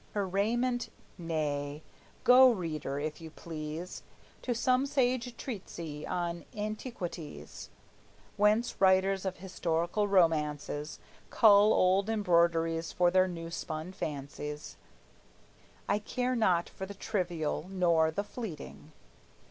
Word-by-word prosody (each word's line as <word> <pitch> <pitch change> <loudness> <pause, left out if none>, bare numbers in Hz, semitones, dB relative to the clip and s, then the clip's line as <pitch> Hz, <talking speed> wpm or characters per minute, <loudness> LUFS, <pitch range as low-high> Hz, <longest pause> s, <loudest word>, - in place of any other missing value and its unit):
Her 200 -2 0
raiment, 240 +6 0 0.3
nay; 150 -3 -3 0.4
go, 255 +1 +8
reader, 160 - -2
if 155 +2 -4
you 160 - -8
please, 160 +2 -7 0.4
To 245 - -1
some 255 +3 +2
sage 250 -3 0
Treatise 170 - -6
on 175 -1 -2
Antiquities, 210 - -6 0.7
Whence 210 +3 +2
writers 190 0 +4
of 190 -1 -2
historical 175 +2 -1
romances 150 -5 +1 0.3
Cull 210 -1 +6
old 190 +3 +3
embroideries 170 -5 +2
for 175 -1 +3
their 185 0 +4
new 165 -2 -6
spun 160 +1 -5
fancies; 150 -2 -6 1.1
I 205 - +2
care 250 +4 -1
not 185 -7 +2
for 190 - -7
the 200 - -8
trivial, 175 -6 -2
nor 170 -4 +3
the 180 +6 -2
fleeting. 205 - -8
180 Hz, 110 wpm, -31 LUFS, 160-210 Hz, 1.1 s, go